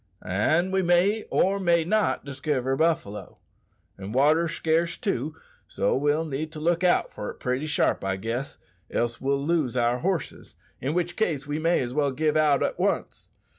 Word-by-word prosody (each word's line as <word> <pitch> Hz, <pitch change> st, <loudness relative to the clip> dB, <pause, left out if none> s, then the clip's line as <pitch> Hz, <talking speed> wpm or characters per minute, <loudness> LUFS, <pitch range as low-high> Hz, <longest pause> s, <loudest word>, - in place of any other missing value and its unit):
"An' 155 Hz, -, +1 dB
we 190 Hz, 0 st, +2 dB
may 185 Hz, +5 st, +2 dB
or 195 Hz, +1 st, +2 dB
may 170 Hz, -3 st, +3 dB
not 210 Hz, 0 st, 0 dB
diskiver 135 Hz, -1 st, -1 dB
buffalo. 120 Hz, -, -1 dB, 0.6 s
An' 100 Hz, +2 st, -6 dB
water's 155 Hz, +5 st, +3 dB
scarce, 165 Hz, +1 st, 0 dB
too, 160 Hz, -, -2 dB, 0.3 s
so -, -, 0 dB
we'll 145 Hz, +4 st, +1 dB
need 155 Hz, +1 st, -4 dB
to 155 Hz, -, -7 dB
look 170 Hz, +3 st, +1 dB
out 180 Hz, -, +2 dB
for 105 Hz, -, -6 dB
it -, -, -7 dB
pretty 130 Hz, +4 st, -2 dB
sharp, 150 Hz, -8 st, +1 dB
I 95 Hz, 0 st, -1 dB
guess, 115 Hz, +7 st, -4 dB, 0.3 s
else 120 Hz, 0 st, -2 dB
we'll 140 Hz, +1 st, 0 dB
lose 150 Hz, -7 st, 0 dB
our 120 Hz, +1 st, +2 dB
horses, 180 Hz, -2 st, -3 dB, 0.2 s
in 140 Hz, +5 st, -2 dB
which 175 Hz, -1 st, -1 dB
case 160 Hz, -10 st, -1 dB
we 145 Hz, +2 st, -3 dB
may 165 Hz, +2 st, +2 dB
as 125 Hz, -1 st, -4 dB
well 145 Hz, 0 st, +1 dB
give 150 Hz, +3 st, 0 dB
out 150 Hz, -2 st, +3 dB
at -, -, -2 dB
once. -, -, -2 dB
155 Hz, 175 wpm, -26 LUFS, 130-170 Hz, 0.6 s, may